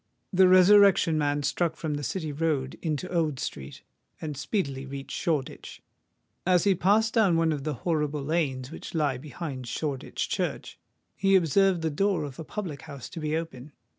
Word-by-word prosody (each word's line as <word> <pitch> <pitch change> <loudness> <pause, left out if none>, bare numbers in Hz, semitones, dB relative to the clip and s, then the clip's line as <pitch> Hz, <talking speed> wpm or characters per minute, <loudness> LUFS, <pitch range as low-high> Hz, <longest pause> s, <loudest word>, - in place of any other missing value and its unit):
The 185 0 +6
Resurrection 185 -2 +6
Man 145 0 0
struck 160 +4 0
from 155 -2 -3
the 145 - -3
City 160 0 -3
Road 145 -3 -1
into 160 +1 -2
Old 155 -6 0
Street, 70 0 -6 0.4
and 150 -2 -5
speedily 140 - -2
reached 135 0 -6
Shoreditch. 150 -6 -3 0.6
As 180 -1 +3
he 200 -1 +4
passed 205 +5 +2
down 200 -8 +4
one 165 -1 +2
of 145 -2 -3
the 155 -2 -1
horrible 150 -4 0
lanes 140 -4 -1
which 165 - -8
lie 145 -5 0
behind 140 -3 -6
Shoreditch 140 +1 -3
Church, - - -3 0.4
he 195 0 +3
observed 185 +1 +3
the 160 - 0
door 195 +3 +1
of 140 -1 -7
a - - -4
public 165 -5 -6
house 140 -5 -9
to - - -7
be 155 0 -1
open. 150 -4 -7
155 Hz, 170 wpm, -27 LUFS, 140-180 Hz, 0.6 s, The